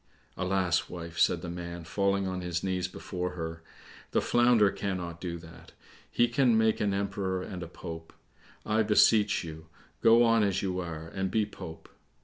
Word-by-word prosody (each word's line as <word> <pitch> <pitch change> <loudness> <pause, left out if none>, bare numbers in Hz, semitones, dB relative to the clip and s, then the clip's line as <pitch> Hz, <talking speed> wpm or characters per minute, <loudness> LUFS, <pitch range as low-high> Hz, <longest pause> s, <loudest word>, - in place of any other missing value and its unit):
"Alas, 95 -1 0
wife," 85 -1 -7
said 85 - +3
the - - -4
man, 85 0 -6
falling 100 +3 0
on 95 0 -3
his 90 -1 -3
knees 90 -1 -1
before 90 0 -5
her, 80 -2 -5 0.5
"the - - +4
Flounder 120 -4 +4
cannot 90 -4 -4
do 85 -2 -4
that; 80 0 -14 0.4
he 120 - +3
can 120 -1 +3
make 110 0 +2
an 105 -1 +2
emperor 100 -2 -2
and 90 -1 -7
a 85 - -5
pope; 80 -1 -8 0.5
I 110 +1 +2
beseech 105 -1 +4
you, 80 -1 -9 0.3
go 115 +1 +6
on 115 -1 +4
as 100 -2 +1
you 90 -1 -1
are, 80 -2 -5
and 95 +1 -2
be 105 +2 +1
Pope." 80 -5 -10
95 Hz, 170 wpm, -29 LUFS, 85-105 Hz, 0.5 s, go